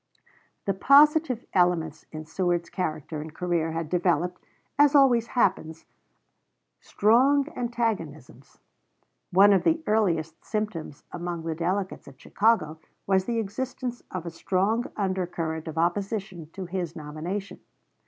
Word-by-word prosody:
The 195 - +1
positive 280 - +4
elements 175 -4 +1
in 155 0 -7
Seward's 175 +1 -1
character 155 -3 -3
and 155 +1 -8
career 170 -3 -1
had 165 -1 -3
developed, 180 +1 0 0.4
as 290 0 +5
always 245 -5 +5
happens, 160 -7 0 0.9
strong 265 +7 +3
antagonisms. 205 - -4 0.7
One 200 +3 +6
of 190 - +2
the 325 -1 +1
earliest 165 -7 0
symptoms 210 -9 -4
among 175 -1 -5
the 165 0 -2
delegates 185 +4 -3
at 135 -1 -14
Chicago 195 -8 +1 0.3
was 190 -1 +2
the 235 -1 -1
existence 245 +3 -4
of 180 -2 -5
a 170 - -5
strong 195 +8 0
undercurrent 175 -5 -2
of 160 - -6
opposition 190 -1 -2
to 190 -2 -6
his 175 -2 -4
nomination. 165 +6 -6
185 Hz, 125 wpm, -26 LUFS, 165-220 Hz, 0.9 s, One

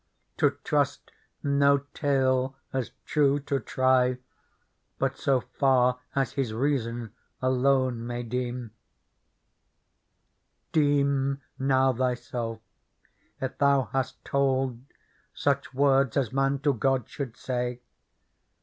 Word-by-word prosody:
To - - +2
trust - - 0 0.3
no 140 0 +4 0.2
tale 130 -2 +1 0.2
as 130 -3 -1 0.2
true 145 -2 +2
to 140 -1 -1
try 130 +1 +2 0.8
But - - 0
so 135 -2 +1
far 125 -2 +2 0.2
as 135 -1 +1
his 125 -6 -2
reason 120 -4 -1 0.3
alone 130 -2 +1
may 120 0 -3
deem. 120 -1 -3 1.0
" - - -49
Deem 140 -2 +2 0.2
now 135 -1 +3
thyself 120 -2 -2 0.8
if 130 0 -3
thou 140 -3 +3
hast 130 -1 -2
told 135 -3 0 0.5
Such 140 -1 0
words 135 -2 +3
as 130 -5 0
man 135 +1 +2
to 145 -1 +3
God 135 +1 0
should 125 -5 -6
say. 125 -1 -3
130 Hz, 105 wpm, -27 LUFS, 125-140 Hz, 1.0 s, no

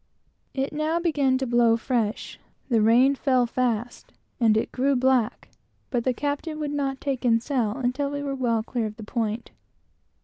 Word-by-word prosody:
It 270 +2 -2
now 310 +3 0
began 290 -6 +2
to 265 - -2
blow 235 -2 +3
fresh; 230 -3 -2 0.3
the 230 -3 +3
rain 240 +5 +5
fell 260 -3 +2
fast, 240 -1 -2 0.3
and 220 -3 +4
it 220 - -1
grew 275 +2 +1
very 245 - -1
black; 260 -4 +1 0.4
but 240 -3 -1
the 260 - +3
captain 290 +3 -3
would 295 -1 -2
not 275 -2 -2
take 270 -3 -3
in 230 -2 +4
sail 235 -4 -1
until 260 +2 -1
we 285 0 -4
were 280 -1 -2
well 235 -4 0
clear 235 -1 -2
of 210 - -8
the 220 - -9
point. 225 +1 -3
255 Hz, 180 wpm, -25 LUFS, 230-280 Hz, 0.4 s, rain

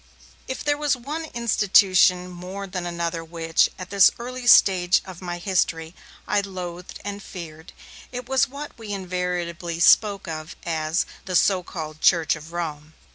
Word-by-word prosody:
If 260 - -5
there 290 0 0
was 295 -3 +1
one 295 +6 -5
institution 195 -7 +3
more 185 +3 -7
than 180 -2 -5
another 170 -1 -3
which, 165 0 +1
at 185 0 -8
this 200 -1 +7
early 250 +1 -6
stage 185 -4 +6
of 185 -2 -10
my 175 -1 -4
history, 170 -3 -1 0.3
I 205 - +2
loathed 180 -2 -7
and 205 0 -5
feared, 165 -3 -10 0.4
it 250 -1 -6
was 265 +1 +2
what 285 +2 -8
we 220 -2 -7
invariably 180 -2 -3
spoke 200 +3 +4
of 155 -1 -6
as 160 +1 0 0.2
'the 185 - -3
so 190 +1 +4
called 155 -3 -7
Church 165 -3 +4
of 155 +1 -11
Rome'. 155 -3 -5
180 Hz, 155 wpm, -24 LUFS, 170-205 Hz, 0.4 s, this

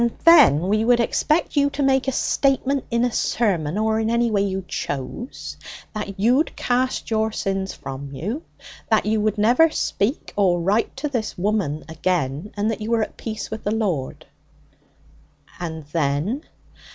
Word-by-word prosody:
'Then 295 - +8
we 215 +2 +2
would 240 +1 +4
expect 305 +8 +1
you 285 -1 +3
to 280 0 -2
make 270 0 +2
a - - +2
statement 275 +1 +1
in 235 0 +2
a 245 - 0
sermon, 190 -9 0
or 220 0 +1
in 220 0 0
any 235 0 +2
way 200 -2 +2
you 190 -2 -2
chose, 145 - -5 0.4
that 205 -2 -5
you'd 250 +9 +2
cast 255 -1 -1
your 220 0 +1
sins 195 -2 -2
from 135 +1 -7
you, 200 - -4 0.5
that 220 -2 +3
you 215 0 +1
would 215 0 0
never 245 +10 +5
speak 250 -4 -2
or 185 -4 +3
write 200 +9 0
to 285 +3 -2
this 240 -6 -3
woman 180 -6 -1
again, 160 +1 -2
and 210 +2 +1
that 220 - -5
you 215 - -4
were 230 -1 +2
at - - -7
peace 220 -2 -6
with 220 - -5
the - - -1
Lord.' 195 -12 -2 1.3
'And 160 -3 -5
then?' 165 - -1
215 Hz, 165 wpm, -22 LUFS, 185-245 Hz, 1.3 s, Then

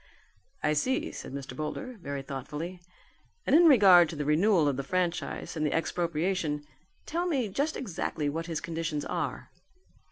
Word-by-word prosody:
"I 150 - +3
see," 255 - 0
said - - -8
Mr. 135 0 -6
Boulder 240 - -4
very 140 -3 -4
thoughtfully, 150 +7 -6 0.6
"and - - +4
in 340 +2 +7
regard 190 - +7
to 160 - -6
the 150 -1 -3
renewal 165 +2 +4
of 140 - +1
the 140 - -2
franchise 180 +3 -2
and 155 - -1
the 150 - +1
expropriation, 165 -2 -1 0.4
tell 345 +3 -1
me 270 -9 0
just 285 +10 -1
exactly 160 - -3
what 165 +4 -3
his 165 -2 -3
conditions 160 -3 -3
are." - - -3
165 Hz, 160 wpm, -29 LUFS, 150-195 Hz, 0.6 s, in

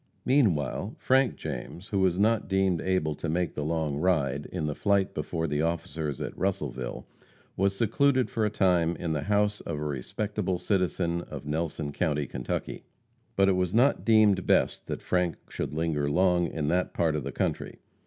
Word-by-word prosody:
Meanwhile 105 - +1
Frank 130 -1 +2
James, 80 - -7
who 100 - 0
was 95 -2 +2
not 110 +2 +2
deemed 95 -3 +2
able 90 -5 0
to 80 +3 -4
make 85 +2 0
the 75 - -3
long 80 -2 -1
ride, 75 -5 +1
in 85 -4 -3
the 75 - -1
flight 100 +2 +1
before 80 +2 -2
the 75 -1 0
officers 80 -3 -2
at - - -5
Russellville, 75 -10 -3 0.5
was 100 +1 +1
secluded 130 +3 +2
for 115 -3 -2
a 105 - +2
time 90 -5 +2
in 85 -3 -3
the 75 - -1
house 105 +4 +1
of 85 - -4
a 75 - -4
respectable 95 - -2
citizen 90 -2 0
of 75 -1 -7
Nelson 75 -1 -2
county, 75 -2 0
Kentucky. 60 -1 -4 0.5
But 95 0 +4
it 95 - +4
was 90 +1 0
not 130 +5 +3
deemed 105 -4 +4
best - - +2
that - - -4
Frank 90 -2 +1
should - - -4
linger 75 -3 0
long 90 +2 +3
in 75 -3 -3
that 90 +2 0
part 80 -3 +1
of 75 - -2
the - - -4
country. - - -2
90 Hz, 180 wpm, -28 LUFS, 75-100 Hz, 0.5 s, But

